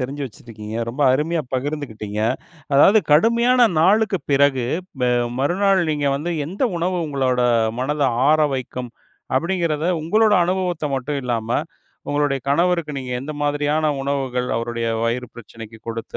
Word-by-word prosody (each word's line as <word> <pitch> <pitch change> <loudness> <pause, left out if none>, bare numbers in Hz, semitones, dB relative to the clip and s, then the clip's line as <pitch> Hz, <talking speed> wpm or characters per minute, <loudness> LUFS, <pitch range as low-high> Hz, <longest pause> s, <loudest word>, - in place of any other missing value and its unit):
தெரிஞ்சு 140 +3 -4
வச்சிருக்கீங்க. 110 -1 -9
ரொம்ப 130 +5 -2
அருமையா 160 +4 0
பகிர்ந்துக்கிட்டீங்க. 125 -7 -4 0.5
அதாவது 195 +10 +6
கடுமையான 235 +7 +4
நாளுக்கு 205 +2 +3
பிறகு 135 -3 +3 0.4
ப - - -1 0.4
மறுநாள் 190 +7 +2
நீங்க 145 -1 -1
வந்து 165 +5 -4 0.2
எந்த 195 - -5
உணவு 180 +2 -1
உங்களோட 130 -3 0 0.4
மனத 145 +3 -1 0.3
ஆறவைக்கும்? 135 -5 0 0.5
அப்டிங்கறத 170 -1 0 0.2
உங்களோட 215 +6 +3
அனுபவத்த 180 -3 -1
மட்டும் 140 +2 -2
இல்லாம, 115 -2 -2 0.6
உங்களோட 145 -1 +1
கணவருக்கு 170 -1 +1
நீங்க 125 -1 -5
எந்த 150 +3 -6
மாதிரியான 145 +1 0 0.2
உணவுகள் 130 -3 -2
அவருடைய 115 0 -3 0.2
வயிறு 120 +1 -2
பிரச்சனைக்கு 115 -1 -11
கொடுத்து, 115 0 -5
145 Hz, 125 wpm, -21 LUFS, 125-170 Hz, 0.6 s, அதாவது